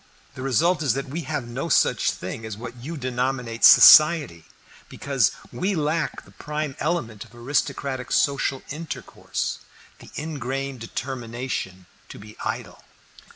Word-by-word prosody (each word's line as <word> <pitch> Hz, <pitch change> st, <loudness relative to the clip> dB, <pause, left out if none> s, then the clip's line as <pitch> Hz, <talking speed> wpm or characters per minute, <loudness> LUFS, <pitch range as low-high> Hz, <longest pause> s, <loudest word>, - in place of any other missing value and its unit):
The 130 Hz, -, -9 dB
result 165 Hz, +6 st, +2 dB
is 135 Hz, -6 st, +1 dB
that 140 Hz, -1 st, -4 dB
we 160 Hz, +6 st, -4 dB
have 145 Hz, -6 st, -3 dB
no 135 Hz, +8 st, -4 dB
such -, -, +3 dB
thing 95 Hz, +5 st, -6 dB
as 110 Hz, -2 st, -6 dB
what 120 Hz, +1 st, -8 dB
you 150 Hz, +7 st, -7 dB
denominate 125 Hz, -2 st, -3 dB
'Society,' 150 Hz, -, +8 dB, 0.4 s
because -, -, +1 dB, 0.2 s
we 195 Hz, +2 st, -1 dB
lack 155 Hz, +1 st, -2 dB
the -, -, -18 dB
prime 150 Hz, -2 st, -5 dB
element 145 Hz, -, -2 dB
of -, -, -18 dB
aristocratic 130 Hz, +1 st, -2 dB
social 140 Hz, -2 st, +1 dB
intercourse, 155 Hz, +2 st, -5 dB, 0.4 s
the -, -, -14 dB
ingrained 135 Hz, -3 st, -4 dB
determination 120 Hz, -5 st, -5 dB, 0.2 s
to -, -, -10 dB
be 105 Hz, +1 st, -12 dB
idle." -, -, -5 dB
135 Hz, 135 wpm, -24 LUFS, 120-150 Hz, 0.4 s, Society